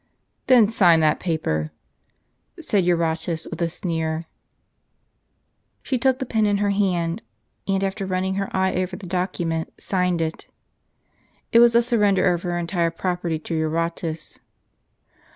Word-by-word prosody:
"Then 245 -5 +6
sign 180 -7 +4
that 155 -1 +2
paper," 80 - -2 0.9
said 200 -3 +1
Eurotas, 165 -1 0
with 170 - -6
a 170 - +1
sneer. 160 -1 -3 1.6
She 255 - -1
took 260 +1 +2
the 260 - -4
pen 220 -3 +1
in 205 -1 +2
her 205 0 +1
hand, 185 -2 0 0.5
and 195 0 0
after 195 0 -2
running 190 0 -1
her 195 - -3
eye 190 0 +1
over 185 0 -3
the 185 - -10
document, 175 -2 -2
signed 180 -2 0
it. 160 -1 -3 1.0
It 230 - +6
was 235 0 +6
a 235 - +6
surrender 205 -6 +3
of 170 - -3
her 175 -1 -2
entire 170 0 0
property 175 -1 -2
to 160 +2 -7
Eurotas. 160 0 -2
180 Hz, 140 wpm, -23 LUFS, 165-200 Hz, 1.6 s, Then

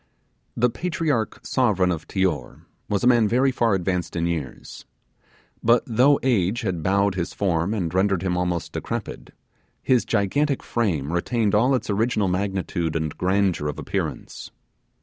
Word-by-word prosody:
The 125 +1 +3
patriarch 155 -9 -2
sovereign 100 -8 +2
of 80 -2 -4
Tior 95 -2 -2 0.3
was 100 -2 0
a - - +4
man 120 -3 +5
very 130 +5 +2
far 115 -5 +2
advanced 90 -1 -2
in 85 0 0
years; 85 -5 -5 0.8
but 115 +1 +4
though 130 +5 +4
age 115 -3 +1
had 95 -6 -2
bowed 100 +2 +2
his 90 -2 -4
form 90 -2 0
and 90 -6 -2
rendered 95 -1 +1
him 90 -2 0
almost 90 -2 -2
decrepid, - - -5 0.5
his 125 -3 +3
gigantic 135 +7 0
frame 85 - -1
retained 105 +4 0
its 125 +3 +2
original 105 0 +1
magnitude 90 -3 -2
and 80 -2 -2
grandeur 95 -4 +1
of 75 - -4
appearance. - - -4
100 Hz, 145 wpm, -23 LUFS, 90-120 Hz, 0.8 s, man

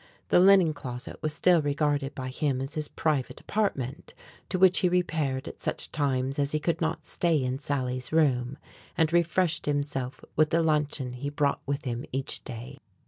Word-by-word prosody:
The - - +5
linen 185 -3 +6
closet 130 -3 -7
was 155 - +1
still 175 +2 +4
regarded 145 -1 0
by 130 -1 -4
him 135 0 -1
as 135 +2 -4
his 155 -2 -2
private 150 -5 -1
apartment, 145 - -2 0.3
to - - 0
which 185 0 +5
he 180 - +3
repaired 155 -7 0
at - - -9
such - - -3
times 135 -1 0
as 140 +1 0
he 155 - +1
could 165 +2 -1
not 165 +1 -1
stay 165 -5 +1
in 130 +1 -2
Sally's 130 -3 -2
room, 135 -5 +2 0.4
and 160 0 +2
refreshed 170 -1 +1
himself 145 -3 -2
with 155 0 +4
the 165 +1 +2
luncheon 150 -4 0
he 135 +3 -4
brought 145 -1 0
with 140 +1 -2
him 120 -1 -3
each 135 +1 -3
day. 130 +2 -8
145 Hz, 180 wpm, -28 LUFS, 130-160 Hz, 0.4 s, linen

